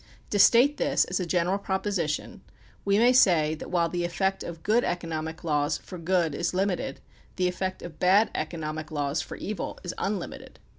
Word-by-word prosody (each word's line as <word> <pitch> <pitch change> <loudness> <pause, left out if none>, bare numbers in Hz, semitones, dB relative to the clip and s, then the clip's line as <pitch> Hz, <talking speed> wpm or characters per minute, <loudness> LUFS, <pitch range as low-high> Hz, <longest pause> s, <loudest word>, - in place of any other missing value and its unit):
To 205 - +1
state 250 +8 +6
this - - +2
as 185 - -2
a 180 - -2
general 180 +3 +1
proposi 190 -4 -1
tion, 150 - -4 0.4
we 200 0 +2
may 240 +3 +5
say 170 -11 +4
that 155 - -7
while 170 -2 +2
the 175 +1 -2
effect 190 +3 -1
of 165 -1 -7
good 225 +4 +3
economic 160 -2 -3
laws 150 -1 +1
for 180 - -10
good 170 -2 +1
is 170 +4 -2
limited, 185 -7 -1 0.4
the 180 -1 +1
effect 185 +1 -3
of 160 -3 -9
bad 195 +5 +4
economic 155 -2 -4
laws 145 0 -1
for - - -8
evil 210 0 -4
is 175 - -4
unlimited. 195 -3 -4
175 Hz, 185 wpm, -27 LUFS, 160-195 Hz, 0.4 s, state